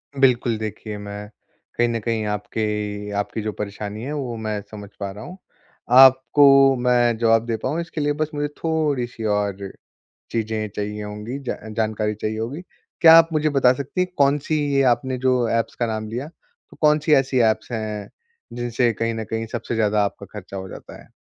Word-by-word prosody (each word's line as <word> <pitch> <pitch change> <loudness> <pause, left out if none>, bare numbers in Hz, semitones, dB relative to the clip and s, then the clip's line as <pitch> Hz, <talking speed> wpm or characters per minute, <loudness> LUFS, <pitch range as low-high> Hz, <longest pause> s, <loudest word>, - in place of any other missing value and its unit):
बिल्कुल, 125 -4 +2
देखिए 110 0 -6
मैं 105 0 -8 0.5
कहीं 120 - +3
न 115 -1 -1
कहीं 115 0 -2
आपके 105 0 -3
आपकी 105 +2 -3
जो 110 0 -3
परेशानी 105 +1 -6
है 140 +4 -4
वो 130 -5 -4
मैं 110 -1 -3
समझ 105 -2 -9
पा 100 -1 -3
रहा 105 +2 -10
हूँ। 180 - -10 0.6
आपको 135 +1 +7
मैं 120 -2 +3
जवाब 115 0 +3
दे 115 -1 -2
पाऊँ 165 +3 -1
इसके 165 -2 -5
लिए 145 0 +1
बस 155 - 0
मुझे 145 0 -1
थोड़ी-सी 145 -8 -1
और 100 -2 -1 0.6
चीज़ें 110 -1 -2
चाहिए 105 0 -4
होंगी, 105 +5 -6
ज 135 -3 -4 0.2
जानकारी 110 -1 0
चाहिए 110 +1 -4
होगी। 125 +9 -4 0.4
क्या 165 -1 +9
आप 165 0 +6
मुझे 155 0 +2
बता 135 -3 +4
सकती 140 +7 -3
हैं 180 - -1
कौन-सी 145 +2 +2 0.2
ये 135 - +3
आपने 130 0 -4
जो 125 -1 +1
ऐप्स 115 0 -1
का 120 - -1
नाम 110 -1 -3
लिया। 125 +6 -4
तो 170 - -22
कौन-सी 150 0 +3
ऐसी 135 -2 +3
ऐप्स 110 - -7
हैं 110 -3 -4 0.4
जिनसे 120 0 0
कहीं 115 +2 -2
न 110 0 -4
कहीं 115 0 -2
सबसे 120 -1 -4
ज़्यादा 105 -1 +2
आपका 100 0 -6
ख़र्चा 100 0 -9
हो 95 0 -6
जाता - - -11
है? - - -23
115 Hz, 185 wpm, -22 LUFS, 105-135 Hz, 0.6 s, क्या